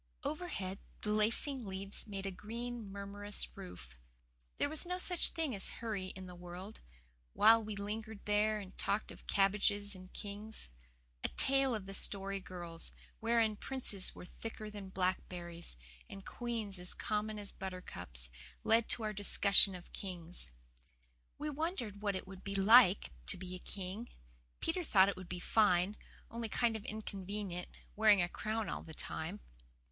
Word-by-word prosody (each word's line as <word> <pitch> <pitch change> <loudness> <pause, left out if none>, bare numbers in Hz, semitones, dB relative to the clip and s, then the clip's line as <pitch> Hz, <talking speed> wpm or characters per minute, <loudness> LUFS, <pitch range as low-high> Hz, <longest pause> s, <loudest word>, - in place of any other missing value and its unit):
Overhead 280 - -3 0.2
the 210 - 0
lacing 230 +4 +2
leaves 195 +3 -5
made 195 -2 -4
a 195 - -1
green, 230 +2 -5
murmurous 200 +1 -3
roof. 120 - -9 0.6
There - - +2
was 310 +1 +4
no 360 0 -2
such 360 -1 +5
thing 320 -5 -1
as 195 - -2
hurry 215 -5 -3
in 190 0 -7
the 180 - -8
world, 180 +4 -8 0.5
while 225 +1 +7
we 215 -1 -4
lingered 215 +1 -5
there 210 +1 +3
and 195 -2 -8
talked 205 +2 0
of - - -13
"cabbages 205 +1 +3
and 185 -1 -11
kings." 210 - -6 0.5
A - - +3
tale 270 -2 +4
of 210 -3 -4
the 195 - -7
Story 195 0 0
Girl's, 175 -3 -8 0.3
wherein 225 -1 +3
princes 210 -5 -1
were - - -8
thicker 215 +2 -7
than 200 -2 -7
blackberries, 175 - -2 0.3
and 195 0 -9
queens 225 -6 -3
as 180 0 -1
common 215 0 -1
as 205 -1 -5
buttercups, 120 - -5 0.3
led 225 0 +4
to 230 - +2
our 215 0 -1
discussion 200 -1 +6
of 175 - -11
kings. 180 - -5 0.9
We 300 +1 -2
wondered 280 - -2
what 200 -2 +1
it 185 - -4
would 190 -1 -10
be 200 0 -3
like 195 - +7 0.2
to - - +1
be 185 0 -6
a 185 - -5
king. 195 +5 -5 0.5
Peter 350 +2 0
thought 195 - +6
it - - -1
would 185 -1 -9
be 180 - -3
fine, 195 -1 +4 0.4
only 230 -1 -3
kind 235 0 +2
of 215 - -5
inconvenient, 200 -3 -4 0.3
wearing 215 -2 +7
a - - +1
crown 215 +3 -2
all - - -3
the 160 - -9
time. 175 +7 -4
205 Hz, 160 wpm, -36 LUFS, 185-220 Hz, 0.9 s, while